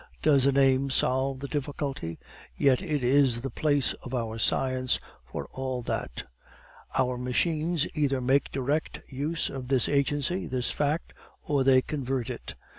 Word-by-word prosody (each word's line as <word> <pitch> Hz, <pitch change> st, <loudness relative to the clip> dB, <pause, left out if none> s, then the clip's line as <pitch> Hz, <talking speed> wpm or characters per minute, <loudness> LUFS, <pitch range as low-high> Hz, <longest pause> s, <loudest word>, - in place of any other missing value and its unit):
Does 140 Hz, -3 st, +5 dB
a -, -, +5 dB
name 135 Hz, 0 st, +3 dB
solve 130 Hz, 0 st, +1 dB
the 140 Hz, -, -4 dB
difficulty? 140 Hz, -, -3 dB, 0.4 s
Yet 135 Hz, +1 st, +4 dB
it 150 Hz, -8 st, -1 dB
is 130 Hz, -2 st, +4 dB
the 135 Hz, -, -4 dB
whole 145 Hz, -2 st, +2 dB, 0.2 s
of 130 Hz, +1 st, -5 dB
our 115 Hz, -2 st, -3 dB
science 130 Hz, +3 st, +1 dB, 0.3 s
for -, -, -4 dB
all 130 Hz, -2 st, -3 dB
that. -, -, -3 dB, 0.7 s
Our 125 Hz, -1 st, +1 dB
machines 155 Hz, +5 st, +1 dB
either 140 Hz, -3 st, +1 dB
make 130 Hz, +2 st, +2 dB
direct 140 Hz, +4 st, -1 dB
use 145 Hz, +5 st, -2 dB
of 130 Hz, -2 st, -6 dB
this 130 Hz, -3 st, +2 dB
agency, 145 Hz, +5 st, 0 dB
this 125 Hz, -1 st, -1 dB
fact, 150 Hz, +3 st, -1 dB, 0.3 s
or 140 Hz, -2 st, +1 dB
they 130 Hz, -1 st, +5 dB
convert 130 Hz, -4 st, -2 dB
it. 120 Hz, -, -7 dB
135 Hz, 150 wpm, -28 LUFS, 130-145 Hz, 0.7 s, Does